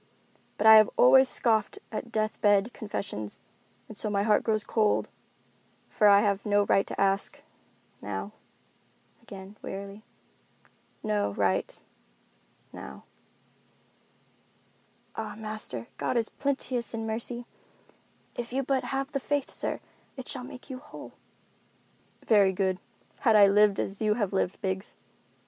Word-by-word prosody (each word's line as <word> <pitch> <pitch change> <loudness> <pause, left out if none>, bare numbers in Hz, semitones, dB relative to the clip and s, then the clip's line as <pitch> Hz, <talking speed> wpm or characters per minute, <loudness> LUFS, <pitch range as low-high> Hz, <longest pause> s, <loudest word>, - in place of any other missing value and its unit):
But 210 - -1
I 220 0 +11
have 215 - +6
always 265 +1 +7
scoffed 220 -3 +1
at 230 +1 -5
death 215 -1 -2
bed 205 +2 +3
confessions, 185 - -5 0.5
and 220 - -10
so 215 - -3
my 200 -1 +1
heart 210 -1 +3
grows 215 -2 0
cold, 215 -2 +1 0.8
for 210 - +3
I 200 0 +7
have 200 -2 0
no 205 -1 +3
right 195 - +2
to - - -6
ask—now." 105 - -4 0.9
Again, 195 +1 -11
wearily, 200 +1 -7 1.0
"No 210 - 0
right—now." 65 - -6 2.1
"Ah, 215 -2 -5
master, 215 - -5
God 250 - -1
is 225 -2 0
plenteous 260 -4 -2
in 225 0 -4
mercy. 235 +2 -3 0.9
If 240 0 -6
you 270 +2 0
but 265 0 0
have 270 +1 -3
the 275 - -1
faith, 285 +1 -2
sir, - - -3 0.4
it 260 - -7
shall 255 -3 -3
make 250 0 -10
you 260 -2 -7
whole." 295 - -11 1.1
"Very 200 -4 +5
good, 190 -1 0 0.4
had 225 -5 +4
I 205 -1 +8
lived 200 0 +4
as 195 +2 -3
you 210 -1 +2
have 205 -4 -1
lived, 190 -1 -1
Biggs." 190 +2 -3
210 Hz, 130 wpm, -28 LUFS, 195-235 Hz, 2.1 s, I